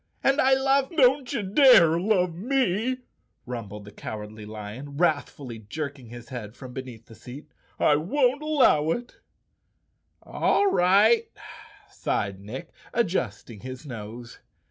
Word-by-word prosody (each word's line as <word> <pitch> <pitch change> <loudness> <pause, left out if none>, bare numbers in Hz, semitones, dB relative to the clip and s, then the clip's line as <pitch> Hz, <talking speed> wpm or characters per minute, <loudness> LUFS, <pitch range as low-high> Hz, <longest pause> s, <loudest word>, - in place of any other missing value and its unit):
And 275 +3 +3
I 265 0 +5
love—" 270 0 +2
"Don't 270 -4 +3
you 225 - -2
dare 190 - +6
love 180 -3 +1
me," 250 +3 0 0.4
rumbled 105 -4 -7
the 105 - -11
Cowardly 105 0 -8
Lion, 110 +7 -8
wrathfully 145 -7 -1
jerking 140 +3 -6
his 120 0 -11
head 115 -4 -7
from 130 -1 -10
beneath 125 -4 -8
the 115 - -15
seat. 135 +7 -12 0.3
"I 145 - +4
won't 255 - +1
allow 270 - +3
it 245 +1 -8 1.1
I" - - -20
"All 400 -1 +2
right," 205 - +4 0.6
sighed 100 -1 -2
Nick, 110 +7 -8 0.2
adjusting 125 - -2
his 130 +5 -9
nose. 120 -1 -9
150 Hz, 130 wpm, -25 LUFS, -, 1.1 s, dare